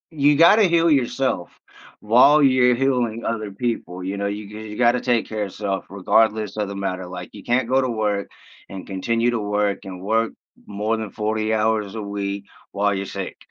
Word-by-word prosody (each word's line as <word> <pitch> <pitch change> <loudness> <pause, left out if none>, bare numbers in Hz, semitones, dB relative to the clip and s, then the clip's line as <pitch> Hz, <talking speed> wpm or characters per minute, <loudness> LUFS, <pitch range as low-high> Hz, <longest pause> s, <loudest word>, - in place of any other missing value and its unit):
you 145 -2 +3
gotta 185 +7 +6
heal 170 -1 +3
yourself 130 - 0 0.5
while 130 +8 +5
you're 130 -2 +4
healing 120 -3 0
other 110 -3 -3
people, 100 -5 -3
you 95 +2 -3
know? 100 0 -2
You 105 +1 -4
you 105 0 -9
gotta 120 +1 +3
take 120 -3 +1
care 110 -1 -4
of - - -4
yourself 100 -1 -4
regardless 105 +2 +1
of 105 -2 -2
the 100 - -6
matter. 95 -2 -3
Like, 90 0 -8
you 100 - -11
can't 120 0 +1
go 130 +1 +3
to 130 - -1
work 105 -3 -1 0.4
and 95 -1 -8
continue 115 +5 0
to 120 - -1
work 105 -1 -1
and 95 -2 -8
work 110 +3 0 0.3
more 105 +2 -2
than 110 -2 -5
40 110 0 -1
hours 110 -2 0
a 110 - -4
week 100 -1 -4 0.3
while 100 0 +1
you're 100 0 -3
sick. 95 0 -6
110 Hz, 190 wpm, -22 LUFS, 100-120 Hz, 0.5 s, gotta